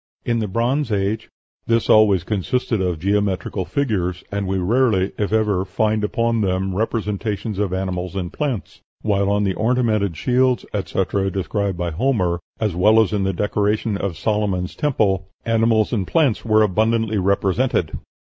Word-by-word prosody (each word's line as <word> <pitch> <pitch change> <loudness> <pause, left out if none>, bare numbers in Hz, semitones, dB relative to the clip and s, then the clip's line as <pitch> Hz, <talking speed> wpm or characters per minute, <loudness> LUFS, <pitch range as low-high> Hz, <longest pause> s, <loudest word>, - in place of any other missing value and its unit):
In 120 -1 +1
the 110 - -1
Bronze 120 +6 0
Age 105 +2 -1 0.4
"this 115 -1 +2
always 105 -5 +5
consists 110 +7 -2
of 95 -6 0
geometrical 100 +1 -1
figures, 90 -5 -1
and 100 -1 -2
we 95 +1 0
rarely, 100 0 +2
if 105 -1 -1
ever, 105 -4 +1
find 105 +3 0
upon 115 +2 0
them 95 -1 0
representations 105 -1 -2
of 100 -3 0
animals 95 -1 -3
and 95 -1 -4
plants, 130 - -4 0.2
while 100 -2 +1
on 105 0 +1
the 95 -2 +1
ornamented 110 -5 0
shields, 125 +3 +1
etc., 95 -1 -1
described 100 0 -2
by 85 -1 -2
Homer, 90 - 0 0.2
as 105 -6 -1
well 105 +5 +5
as 110 -3 +2
in 100 -2 0
the 95 - +1
decoration 105 +3 0
of 100 -4 -3
Solomon's 100 -3 -1
Temple, 100 - 0 0.2
animals 115 -1 +2
and 100 -6 -1
plants 145 -9 +2
were 110 -1 +4
abundantly 110 +1 +1
represented." 100 +6 0
105 Hz, 155 wpm, -21 LUFS, 95-110 Hz, 0.4 s, always